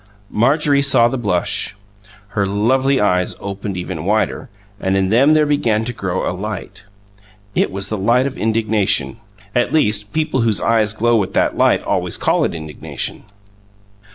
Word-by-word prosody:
Marjorie 140 Hz, +4 st, +2 dB
saw 135 Hz, -4 st, +5 dB
the 125 Hz, -, -3 dB
blush. 100 Hz, -1 st, -1 dB, 0.5 s
Her 100 Hz, -1 st, -1 dB
lovely 130 Hz, +7 st, +1 dB
eyes 90 Hz, -3 st, +1 dB
opened 100 Hz, -1 st, -5 dB
even 90 Hz, -3 st, -5 dB
wider, 110 Hz, +6 st, -1 dB, 0.3 s
and 95 Hz, 0 st, 0 dB
in 95 Hz, -1 st, +1 dB
them 135 Hz, +8 st, +4 dB
there 155 Hz, -1 st, +4 dB
began 115 Hz, -7 st, +1 dB
to 120 Hz, -, -4 dB
grow 95 Hz, -5 st, -3 dB
a -, -, -1 dB
light. 105 Hz, +1 st, -7 dB, 0.7 s
It -, -, +1 dB
was 95 Hz, 0 st, -3 dB
the 110 Hz, -, -3 dB
light 120 Hz, +6 st, +2 dB
of 140 Hz, -1 st, -3 dB
indignation; 110 Hz, -1 st, +1 dB, 0.4 s
at 120 Hz, 0 st, +1 dB
least, 105 Hz, -9 st, +1 dB
people 155 Hz, -4 st, 0 dB
whose 110 Hz, -5 st, +1 dB
eyes 110 Hz, -2 st, +1 dB
glow 120 Hz, +2 st, +2 dB
with 100 Hz, -4 st, -2 dB
that -, -, +1 dB
light -, -, +2 dB
always -, -, -1 dB
call -, -, +1 dB
it -, -, -3 dB
indignation. 80 Hz, +5 st, -5 dB
110 Hz, 160 wpm, -18 LUFS, 100-125 Hz, 0.7 s, saw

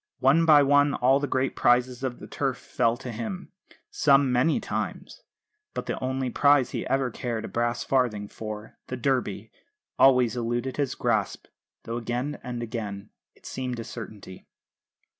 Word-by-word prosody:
One 145 Hz, +6 st, +4 dB
by 150 Hz, -2 st, +8 dB
one 145 Hz, 0 st, +4 dB
all 130 Hz, +2 st, +3 dB
the 145 Hz, -, -2 dB
great 130 Hz, 0 st, 0 dB
prizes 125 Hz, +1 st, +2 dB
of 130 Hz, -2 st, -2 dB
the -, -, -10 dB
Turf 135 Hz, -3 st, -2 dB
fell 115 Hz, -1 st, 0 dB
to 125 Hz, -, -7 dB
him 115 Hz, -, -6 dB, 0.4 s
some 140 Hz, -2 st, +4 dB
many 125 Hz, -, +2 dB
times -, -, -5 dB, 0.5 s
but -, -, -3 dB
the -, -, -3 dB
only 130 Hz, -1 st, -1 dB
prize 145 Hz, -1 st, +4 dB
he -, -, -3 dB
ever 135 Hz, -2 st, 0 dB
cared 115 Hz, -1 st, -4 dB
a -, -, -5 dB
brass 120 Hz, 0 st, -1 dB
farthing 120 Hz, -6 st, 0 dB
for, 110 Hz, 0 st, -8 dB
the 130 Hz, -, -4 dB
Derby, 115 Hz, -5 st, -1 dB, 0.5 s
always 125 Hz, -4 st, +5 dB
eluded 120 Hz, +2 st, -2 dB
his 140 Hz, -3 st, -1 dB
grasp, 110 Hz, -4 st, -1 dB, 0.4 s
though 115 Hz, +1 st, -4 dB
again 120 Hz, +5 st, -3 dB
and 120 Hz, -2 st, -5 dB
again 105 Hz, -3 st, -5 dB, 0.2 s
it -, -, -24 dB
seemed 125 Hz, -2 st, -4 dB
a -, -, -4 dB
certainty. 105 Hz, -5 st, -9 dB
125 Hz, 160 wpm, -26 LUFS, 115-135 Hz, 0.5 s, by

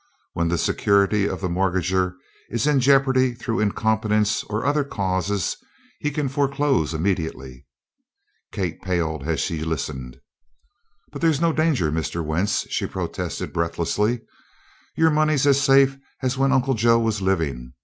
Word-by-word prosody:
When 85 Hz, 0 st, 0 dB
the 85 Hz, +1 st, 0 dB
security 100 Hz, +3 st, +2 dB
of -, -, -5 dB
the 90 Hz, -, -1 dB
mortgager 90 Hz, 0 st, 0 dB, 0.3 s
is 115 Hz, +2 st, -1 dB
in 150 Hz, -2 st, +3 dB
jeopardy 130 Hz, -1 st, +3 dB
through 120 Hz, -1 st, -3 dB
incompetence 105 Hz, 0 st, +1 dB
or 105 Hz, +3 st, -3 dB
other 145 Hz, +1 st, +2 dB
causes 95 Hz, -5 st, -2 dB, 0.4 s
he 150 Hz, -, -1 dB
can 150 Hz, -1 st, -2 dB
foreclose 140 Hz, -, 0 dB
immediately." 80 Hz, -8 st, -3 dB, 0.8 s
Kate 90 Hz, -6 st, -3 dB
paled 80 Hz, -5 st, -2 dB
as 80 Hz, -3 st, 0 dB
she 80 Hz, -2 st, -2 dB
listened. 70 Hz, -5 st, -4 dB, 0.9 s
"But -, -, -8 dB
there's 160 Hz, -4 st, +2 dB
no 165 Hz, 0 st, +2 dB
danger, 155 Hz, -, +1 dB
Mr. 80 Hz, +1 st, -2 dB
Wentz," 85 Hz, +7 st, 0 dB
she -, -, -1 dB
protested -, -, -4 dB
breathlessly. 85 Hz, +7 st, 0 dB, 0.8 s
"Your 160 Hz, 0 st, +4 dB
money's 155 Hz, -2 st, +2 dB
as 140 Hz, -1 st, +4 dB
safe 135 Hz, -1 st, +4 dB, 0.2 s
as 130 Hz, 0 st, 0 dB
when 135 Hz, 0 st, +2 dB
Uncle 135 Hz, 0 st, +2 dB
Joe 115 Hz, 0 st, +4 dB
was 110 Hz, -3 st, 0 dB
living. 70 Hz, -10 st, -1 dB
105 Hz, 140 wpm, -23 LUFS, 85-135 Hz, 0.9 s, Your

